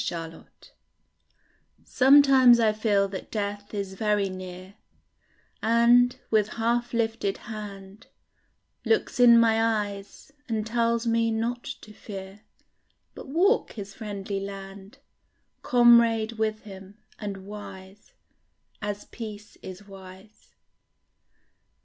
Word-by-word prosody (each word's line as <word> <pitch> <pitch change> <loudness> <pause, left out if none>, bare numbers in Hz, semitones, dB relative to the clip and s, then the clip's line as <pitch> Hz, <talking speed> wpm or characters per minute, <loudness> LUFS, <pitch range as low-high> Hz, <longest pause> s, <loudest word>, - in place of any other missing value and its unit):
THE - - -3 0.2
GUEST - - -19 1.1
Sometimes 265 -2 +6
I 220 -2 +3
feel 210 -2 +1
that 190 -1 -8
death 205 -1 -4
is 200 -2 -5
very 205 0 0
near, 185 0 -9 0.9
And, 240 +2 +4
with 215 -2 +3
half 235 +1 -1
lifted 225 -3 -1
hand, 205 -1 -10 0.8
Looks 445 - 0
in 235 -1 +7
my 225 -1 +3
eyes, 205 +1 -3 0.2
and 220 -2 -2
tells 230 +1 0
me 230 0 +1
not 230 +2 -3 0.2
to 210 - -13
fear, 195 -1 -10 0.7
But - - -11
walk 360 - +1
his 200 -2 -8
friendly 200 -2 -5
land, 195 +2 -9 0.6
Comrade 235 -2 +4
with 220 -1 -2
him, 195 -1 -12 0.2
and 195 -3 -6
wise 200 -1 -11 0.7
As 205 0 -5
peace 210 -2 -9
is 190 +2 -11
wise. 190 +2 -15
215 Hz, 105 wpm, -26 LUFS, 195-230 Hz, 1.1 s, in